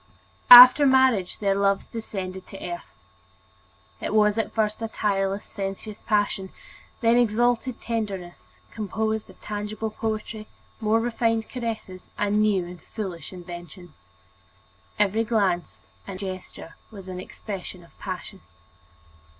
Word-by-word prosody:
After 250 +3 +11
marriage 260 -8 +3
their 200 -2 +1
love 200 0 0
descended 190 -5 -6
to 195 - -10
earth. 345 0 -7 1.1
It - - -2
was 210 0 +4
at 225 - -2
first 215 0 -1
a 225 - -2
tireless, 200 -2 -1
sensuous 195 +2 -6
passion, 205 -3 0 0.5
then 230 0 +4
exalted 240 +1 +1
tenderness 200 -6 -5 0.2
composed 220 0 -3
of - - -16
tangible 210 +1 -4
poetry, 215 0 -4 0.3
more 220 +1 +2
refined 230 -1 0
caresses, 225 -7 -6
and 205 +1 +1
new 200 -4 +2
and 175 0 -10
foolish 180 -7 -7
inventions. 175 - -11 1.0
Every 210 +2 +2
glance 185 - -1 0.2
and 195 -2 -6
gesture 185 -3 -8
was 195 -4 -11
an 185 -1 -6
expression 185 -2 -8
of 170 - -21
passion. 190 0 -7
210 Hz, 120 wpm, -25 LUFS, 190-225 Hz, 1.1 s, After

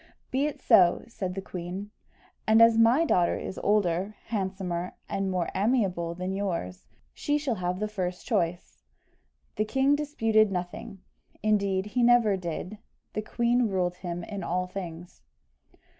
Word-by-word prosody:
"Be 275 +3 +1
it 300 - -6
so," 185 -7 +5
said 185 -5 -5
the 195 - -4
queen; 185 +3 -6 0.6
"and 220 +1 +6
as 230 0 +7
my 230 +8 +5
daughter 175 - +2
is - - -6
older, 200 -1 +1
handsomer, 190 -4 -3
and 195 -1 -2
more 180 -2 -1
amiable 190 -6 0
than 185 +2 -3
yours, 170 - -3 0.3
she 295 0 0
shall 290 -4 -1
have 180 -2 -2
the 215 - -1
first 185 -4 -4
choice." 180 -6 -2 0.8
The 215 - +1
king 270 +5 +3
disputed 225 -8 +2
nothing; 180 +1 -5 0.4
indeed, 200 -3 +1
he 225 +4 -1
never 235 -4 +5
did 180 +3 -5 0.3
the 215 - -1
queen 235 +2 +1
ruled 180 -2 -1
him 175 -1 -5
in 200 +2 -6
all 180 +2 -1
things. 175 - -8
195 Hz, 145 wpm, -27 LUFS, 180-225 Hz, 0.8 s, as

